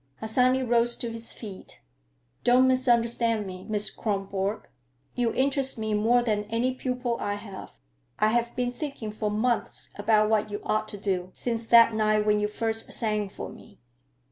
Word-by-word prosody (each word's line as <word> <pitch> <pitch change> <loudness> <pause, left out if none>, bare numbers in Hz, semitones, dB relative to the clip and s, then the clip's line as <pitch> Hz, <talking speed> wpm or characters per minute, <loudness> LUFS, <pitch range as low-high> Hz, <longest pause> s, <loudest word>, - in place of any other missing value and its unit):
Harsanyi 255 +4 +2
rose 240 0 +3
to 235 - -4
his 230 0 -4
feet. 200 -5 -10 0.6
"Don't 250 +2 +5
misunderstand 235 -3 +2
me, 185 -1 -8
Miss 210 -2 +2
Kronborg. 200 0 -3 0.5
You 240 -2 0
interest 270 -1 0
me 220 -1 -2
more 230 +4 +3
than 210 -3 0
any 230 +4 0
pupil 250 -2 -2
I 205 - -2
have. 205 -2 -9 0.4
I 215 - +3
have 235 +1 0
been 245 -1 -1
thinking 250 -6 -5
for 210 0 -2
months 225 +3 -1
about 215 0 +3
what 215 -1 +1
you 205 0 -4
ought 215 0 0
to 205 - -7
do, 185 -3 -2
since 230 -2 -2
that 230 -1 +7
night 215 -1 +2
when 210 0 +3
you 210 - +1
first 225 +1 -1
sang 210 -3 -1
for - - -7
me." 205 - -15
225 Hz, 170 wpm, -27 LUFS, 210-240 Hz, 0.6 s, that